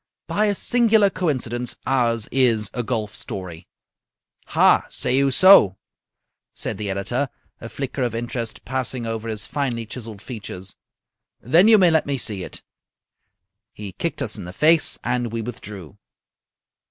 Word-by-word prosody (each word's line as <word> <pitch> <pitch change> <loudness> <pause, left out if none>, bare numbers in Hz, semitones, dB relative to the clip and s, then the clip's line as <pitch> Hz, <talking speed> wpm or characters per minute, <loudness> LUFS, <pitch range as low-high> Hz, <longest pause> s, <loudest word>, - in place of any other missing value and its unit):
"By 215 +1 0
a 205 - +1
singular 220 -3 +3
coincidence, 125 -9 -2
ours 115 -4 +1
is 115 -6 +2
a 125 - -2
golf 110 -3 -3
story." 90 -5 -7 0.8
"Ha! - - +4
say - - 0
you 140 +1 +3
so?" 135 - +6 0.8
said - - -3
the 105 -1 -3
editor, 120 +8 -2 0.3
a 115 - -8
flicker 135 +1 -5
of 120 -3 -1
interest 120 -1 -4
passing 130 -1 -3
over 115 0 -4
his 110 -1 -3
finely 125 -6 -2
chiselled 110 -3 -8
features. 100 -5 -7 0.6
"Then 165 - +4
you 225 -1 +8
may 180 -4 +5
let 160 -2 +2
me 140 -1 -1
see 105 -6 -2
it." - - -7 1.1
He 105 -2 -8
kicked 145 - -3
us 110 - -1
in - - -7
the 90 - -8
face, 160 - +3
and 120 -2 -1
we 115 -1 -3
withdrew. 105 - -9
120 Hz, 150 wpm, -22 LUFS, 105-140 Hz, 1.1 s, you